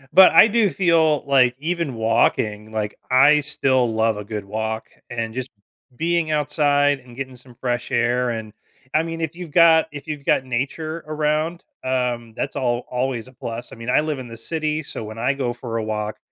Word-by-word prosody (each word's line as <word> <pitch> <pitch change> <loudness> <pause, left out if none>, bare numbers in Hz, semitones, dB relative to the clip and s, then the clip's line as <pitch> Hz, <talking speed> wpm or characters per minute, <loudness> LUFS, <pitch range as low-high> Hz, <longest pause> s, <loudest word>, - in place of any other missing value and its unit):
But 190 -1 +9
I - - +9
do 220 -2 +3
feel, 160 -3 +2
like 130 -3 +4
even 165 -2 -2
walking, 110 -1 +1
like, 105 -1 -2 0.2
I 140 +4 +6
still 135 -5 +1
love 110 0 +2
a 105 - -5
good 105 -1 -5
walk 110 +2 -3 0.2
and 115 -2 -3
just 130 +1 -4 0.5
being 170 +2 0
outside 145 -2 +2
and 125 -1 -16
getting 130 0 -6
some 125 0 -17
fresh 120 0 -3
air, 120 +1 +1
and, 110 -2 -5 0.4
I 155 - +4
mean, 165 0 -5
if 160 0 -3
you've 175 -2 -7
got 165 0 +6
if 145 -1 -8
you've 150 -2 -5
got - - +3
nature 150 +6 -3
around, 155 +2 -1 0.2
um, 125 -3 -1
that's - - -3
al 120 -1 -1
always 125 -1 -2
a 130 - -15
plus. 120 -1 -6
I - - -9
mean, 115 +1 -6
I 125 - +4
live 155 -3 -3
in 130 - -7
the 115 -1 -10
city, 155 +4 -2
so, 125 - -7
when 110 +1 -8
I 125 +4 +1
go 135 -3 -2
for 120 -1 -5
a 115 - -1
walk, 105 -1 -3
130 Hz, 200 wpm, -22 LUFS, 115-155 Hz, 0.5 s, But